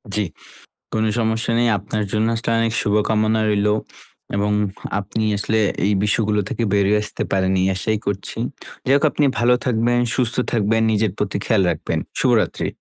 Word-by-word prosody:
জ্বি। 105 -1 +1 0.7
কোন 110 - +1 0.2
সমস্যা 110 0 0
নেই। 120 - +3
আপনার 105 +2 -3
জন্য 110 +1 +1
আসলে 115 +1 -2
অনেক 115 0 0
শুভকামনা 110 +1 +1
রইলো। 105 0 +2 0.6
এবং 105 +1 0 0.5
আপনি 110 +2 -3
আসলে 110 +2 +1 0.3
এই 100 - +2
বিষয়গুলো 105 0 +1
থেকে 120 - -2
বেরিয়ে 100 +1 +3
আসতে - - -4
পারেন 95 -1 +1
এই 95 - +2
আশাই 110 +3 -1
করছি। 100 -1 -4 0.5
যাই 130 - +3
হোক 140 - +1
আপনি 150 - +1
ভালো 120 +2 +4
থাকবেন, 120 0 +1 0.2
সুস্থ 125 -3 0 0.2
থাকবেন, 110 0 +1
নিজের 110 -1 +1
প্রতি 100 -1 -2
খেয়াল 110 -4 +3
রাখবেন। 75 - -2 0.2
শুভরাত্রি। - - +1
110 Hz, 160 wpm, -20 LUFS, 100-115 Hz, 0.7 s, ভালো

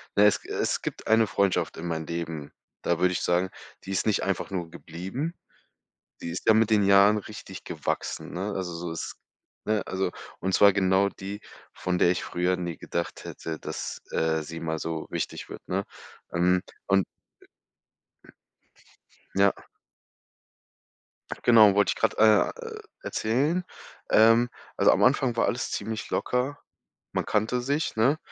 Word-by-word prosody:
Na 100 - +5
ja, 105 - +9
es - - -1
g - - -14
es - - 0
gibt - - -5
eine 110 0 +5
Freundschaft 95 -1 0
in 85 +1 -5
meinem 80 -1 -2
Leben, 80 -3 -5 0.3
da 85 - +1
würde 90 0 +3
ich - - -2
sagen, 90 +1 +2 0.4
die 95 - -5
ist 95 - 0
nicht 105 - +2
einfach 95 0 -2
nur 85 -3 -3
geblieben, 95 - -5 0.9
die 85 - -4
ist 90 - -6
ja 110 - +8
mit 110 0 +3
den 105 -1 +5
Jahren 100 +2 +6
richtig 100 -2 -9
gewachsen, 80 -5 -3
ne? 100 +4 -3
Also, 90 -3 -3
so 85 0 -5
ist 80 - -5 0.5
ne? 105 -2 0
Also, 95 -1 -1 0.3
und 95 0 -2
zwar 100 -2 +7
genau 95 0 +3
die, 100 +2 -7 0.3
von 90 -1 -2
der 85 - +5
ich 90 - -2
früher 90 +1 0
nie 85 -2 -4
gedacht 85 0 -4
hätte, 80 -1 -6
dass, - - -5
äh, 80 -1 +1
sie 80 +1 -7
mal 80 -1 -2
so 80 -1 -3
wichtig - - -4
wird, - - -8
ne? 95 +2 -1 0.5
Ähm, 90 +2 +3 0.3
und 95 -1 +4 2.3
Ja. 100 0 +5 1.9
Genau 110 -4 +7
wollte 100 0 +3
ich - - -2
gerade, - - +1
äh, 110 - +4
e - - -11 0.2
erzählen. 145 +11 0 0.5
Ähm, 115 +2 +6 0.3
also, - - +6
am - - +2
Anfang 125 -2 +3
war - - +3
alles 120 - -1
ziemlich 110 0 -4
locker. 130 +3 -1 0.5
Man - - -1
kannte 110 +4 +1
sich, 140 +1 -1
ne? 135 +8 +3
95 Hz, 160 wpm, -27 LUFS, 85-110 Hz, 2.3 s, ja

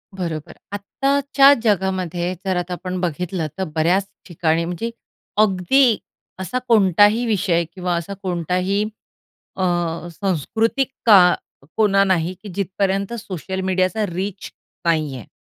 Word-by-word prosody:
बरोबर. 165 -5 -4 0.2
आत्ताच्या 275 +6 +3
जगामध्ये 185 -4 0
जर 190 - 0
आता 180 0 -3
आपण 185 0 -4
बघितलं 175 -1 -2
तर 190 - -1
बऱ्याच 175 +5 +2 0.2
ठिकाणी 165 -1 0
म्हणजे 180 +7 -4 0.5
अगदी 215 +5 +3 0.4
असा 190 +7 -2
कोणताही 210 +1 +4
विषय 190 -6 +1
किंवा 180 -2 -2
असा 170 +4 -4
कोणताही 180 +3 0 0.7
अ, 190 - -2 0.5
सांस्कृतिक 220 - 0 0.2
का 185 -5 +7 0.4
कोना 200 -2 +4
नाही 185 -2 +1
की 210 - -8
जिथपर्यंत 195 +2 -1
सोशल 190 -3 -5
मीडियाचा 185 +3 0
रीच 185 +2 -5 0.4
नाही 155 -5 +1
आहे. 120 - -10
190 Hz, 115 wpm, -21 LUFS, 175-205 Hz, 0.7 s, का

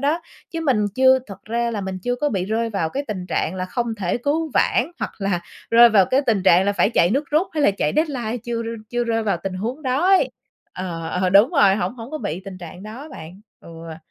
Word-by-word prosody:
đó, 295 +5 +1 0.3
chứ 330 - -4
mình 250 -10 +2
chưa 260 +1 +5
thật 195 -3 -11
ra 235 +2 -1
là 215 -3 -3
mình 190 -1 -4
chưa 245 - 0
có 295 +4 0
bị 190 -6 -1
rơi 225 +3 -1
vào 195 -6 -1
cái 280 +2 -3
tình 185 -4 -4
trạng 170 0 -1
là 185 -1 -3
không 230 +5 -2
thể 190 -5 -1
cứu 305 +5 -1
vãn 260 +8 +2
hoặc - - -3
là 195 -3 -1 0.3
rơi 235 +1 +8
vào 200 -5 +4
cái 260 - +2
tình 215 -5 +2
trạng 185 -1 +5
là 200 - +1
phải 205 - +2
chạy 175 -5 +3
nước 280 +6 -1
rút 315 +6 +2
hay 305 -2 0
là - - +5
chạy 170 -6 -1
deadline 255 -7 -1
chưa 235 -1 -2
r - - -7 0.2
chưa 240 0 0
rơi 225 -1 0
vào 200 -5 0
tình 195 -1 -4
huống 235 +10 -4
đó 270 +6 0
ấy 325 -10 +4 0.4
ờ, 170 -3 -5
ờ, 180 +2 0
đúng 200 - +6
rồi, 205 - +4
hổng 195 +1 -2
hổng 235 0 -9
có 310 - -4
bị 165 - -4
tình 190 -2 -8
trạng 175 +1 -10
đó 235 +9 -9
bạn, 175 +5 -10 0.2
ừa. 165 -1 -10
220 Hz, 250 wpm, -21 LUFS, 185-260 Hz, 0.4 s, rơi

